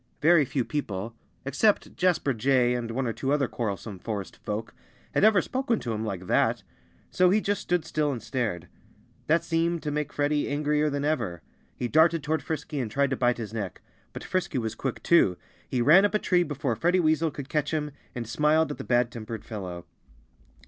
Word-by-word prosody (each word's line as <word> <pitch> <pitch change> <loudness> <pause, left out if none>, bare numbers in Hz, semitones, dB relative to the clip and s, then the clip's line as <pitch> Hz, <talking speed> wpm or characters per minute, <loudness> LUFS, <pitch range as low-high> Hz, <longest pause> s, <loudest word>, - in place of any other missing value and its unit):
Very 160 0 +5
few 130 -1 -1
people 110 -7 -3 0.3
except 200 +10 +1
Jasper 175 -6 +2
Jay 125 +1 +2
and 120 -2 -3
one 130 +3 -2
or 115 - -1
two 135 +4 -2
other 145 -3 +2
quarrelsome 100 -4 -4
forest 100 -1 -5
folk 110 +1 -5 0.4
had - - +2
ever 210 -4 +5
spoken 255 -3 -1
to 115 - -3
him 110 0 -3
like 95 -4 -4
that. - - +2 0.5
So 180 0 +4
he 205 +4 +4
just 205 -1 -1
stood 175 -4 0
still 155 -2 0
and 125 - -3
stared. 110 -6 -3 0.6
That 165 +2 +3
seemed 165 0 0
to 150 - -2
make 150 -1 -2
Freddie 145 0 0
angrier 150 +1 +1
than 145 0 -2
ever. 110 - -1 0.3
He 125 - -2
darted 160 +3 +4
toward 155 0 0
Frisky 150 -1 -4
and 120 -4 -2
tried 140 +4 +1
to - - +1
bite 125 -1 +2
his 110 -2 -6
neck. 100 -5 -5 0.3
But - - -8
Frisky 185 -6 -2
was 115 -3 -2
quick, 135 0 -4
too. 100 - +4 0.3
He 125 -2 +1
ran 165 +9 +7
up 205 +1 +2
a - - +6
tree 180 -4 +2
before 145 -7 -1
Freddie 175 +10 +2
Weasel 160 -1 +2
could 140 -2 -7
catch 150 -1 -1
him, 150 -2 -2 0.2
and 120 -2 -4
smiled 150 +6 +2
at - - -7
the - - -4
bad 120 -1 +2
tempered 115 -1 -7
fellow. 90 -6 -6
140 Hz, 200 wpm, -27 LUFS, 115-160 Hz, 0.6 s, ran